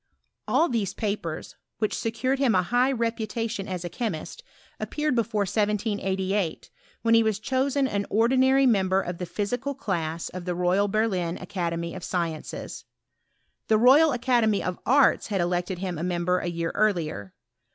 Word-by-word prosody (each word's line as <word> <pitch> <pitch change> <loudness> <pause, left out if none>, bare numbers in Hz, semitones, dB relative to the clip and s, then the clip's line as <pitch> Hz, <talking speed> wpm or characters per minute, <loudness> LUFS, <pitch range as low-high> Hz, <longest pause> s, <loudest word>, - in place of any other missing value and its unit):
Ail 335 - +4
these 215 - -2
papers, 200 -7 -4 0.2
which 215 -1 -1
secured 255 +4 -1
him 260 -6 +3
a 185 - +3
hi^ 245 +7 +2
reputation 225 -2 -2
as 180 -2 -4
a - - -1
chemist, 220 - -5 0.4
appeared 300 -1 -1
before 220 -3 0
1788, 200 -3 -1 0.3
when 230 0 +3
he 230 - +7
was 220 -3 +1
chosen 265 +3 0
an 200 -4 -2
ordinary 260 +4 +4
member 190 -5 +3
of 175 -2 -4
the 180 - -4
physical 245 +9 -2
cla?s 170 -8 -3
of 180 -1 -7
the 180 -1 -2
Royal 180 +3 +2
Berlin 195 -5 0
Academy 170 -2 -3
of 185 - -8
Sciences. 170 -3 -4 0.8
The 220 - +4
Royal 275 +7 +6
Academy 240 -4 +2
of 180 -1 -3
Arts 275 +3 +4
had 200 -3 -1
elected 175 +1 -1
him 180 -3 -4
a - - -3
member 180 0 0
a - - -4
year 170 -1 -2
earlier. 165 - -1
205 Hz, 155 wpm, -26 LUFS, 180-235 Hz, 0.8 s, he